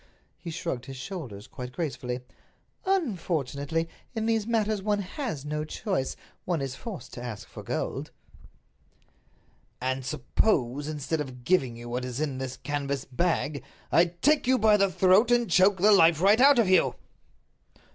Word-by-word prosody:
He 175 - -7
shrugged 160 -6 -4
his 135 -1 -7
shoulders 125 - -7
quite 125 0 -8
gracefully. 130 -6 -3 0.7
"Unfortunately, 165 - -1 0.3
in 220 -1 -1
these 225 -1 +1
matters 215 -3 +1
one 210 +1 +1
has 200 - -4
no 150 +1 -2
choice—one 175 - -3
is 135 -2 -3
forced 205 -1 -8
to 120 - -7
ask 115 -4 -6
for - - -10
gold." - - -3 1.7
"And 130 +1 -2
suppose, 135 - 0
instead 155 +1 -2
of 130 -3 -8
giving 130 -6 +2
you 120 0 -9
what 125 +1 -3
is 125 +1 -4
in 140 -4 -2
this 130 -1 -5
canvas 140 -1 -3
bag, 150 0 -1 0.3
I 170 - +6
take 245 - +1
you 260 0 +4
by 215 -1 +5
the 195 -2 +3
throat 190 +6 +4
and 240 -1 +3
choke 190 +2 +4
the 205 +4 +5
life 165 -5 +6
right 205 +6 +5
out 280 0 +7
of 230 -4 +4
you?" 185 0 +4
165 Hz, 155 wpm, -27 LUFS, 130-205 Hz, 1.7 s, out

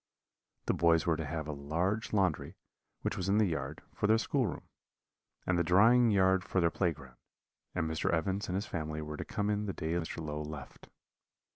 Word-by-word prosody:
The - - +2
boys 85 -1 +3
were 85 - +3
to 80 -1 -4
have 80 0 -4
a - - -2
large 85 +10 -1
laundry, 95 -7 0 0.5
which - - -1
was 95 +1 -2
in 100 - +3
the 110 - +5
yard, 75 -4 -3
for 105 - 0
their 110 +1 +5
schoolroom, 125 +1 -1 0.8
and 90 -1 +1
the - - +3
drying 115 +8 +5
yard 95 -2 +3
for 95 - 0
their 85 -1 +3
play 90 -3 +1
ground; 65 -5 -12 0.6
and 85 -3 0
Mr. 80 0 -1
Evans 95 +4 0
and 90 - -2
his 100 - -1
family 80 -1 -4
were 75 0 -6
to - - -4
come 105 0 -1
in 105 0 -1
the 95 - -2
day 80 -1 -3
Mr. 85 -1 -2
Low 75 -1 -4
left. 75 -2 -9
85 Hz, 205 wpm, -32 LUFS, 80-100 Hz, 0.8 s, the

